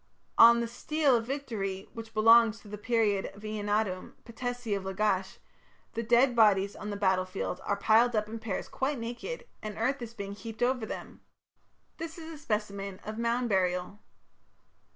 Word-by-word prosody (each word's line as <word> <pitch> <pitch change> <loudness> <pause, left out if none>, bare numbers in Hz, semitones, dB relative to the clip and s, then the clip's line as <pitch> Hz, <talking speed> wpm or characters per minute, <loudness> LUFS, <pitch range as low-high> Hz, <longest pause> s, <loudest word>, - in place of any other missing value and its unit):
On 235 +1 +9
the 235 - -1
"stele 275 +3 +2
of 230 0 -4
victory", 215 -9 -3
which 225 -1 -9
belongs 225 0 +6
to - - -15
the 210 0 -7
period 210 -3 +1
of 205 - -14
Eannatum, 210 -3 -2
patesi 245 -2 -3
of 195 - -4
Lagash, 190 0 -1 0.6
the 230 - -2
dead 240 +2 +4
bodies 200 -3 +4
on 210 - -6
the 205 - -3
battlefield 185 -2 0
are 200 - 0
piled 225 +4 +4
up 210 0 +1
in 225 +1 -6
pairs 220 -4 -4
quite 275 +2 -2
naked, 240 - -5 0.2
and 215 -1 -6
earth 260 +4 0
is 235 -1 -7
being 200 -1 -5
heaped 220 +3 -5
over 245 -3 +1
them; - - -8 0.8
this 330 0 -6
is 325 0 -8
a - - -9
specimen 200 -7 -3
of 215 +1 -6
mound 235 +1 +1
burial. 185 0 0
220 Hz, 170 wpm, -30 LUFS, 200-240 Hz, 0.8 s, On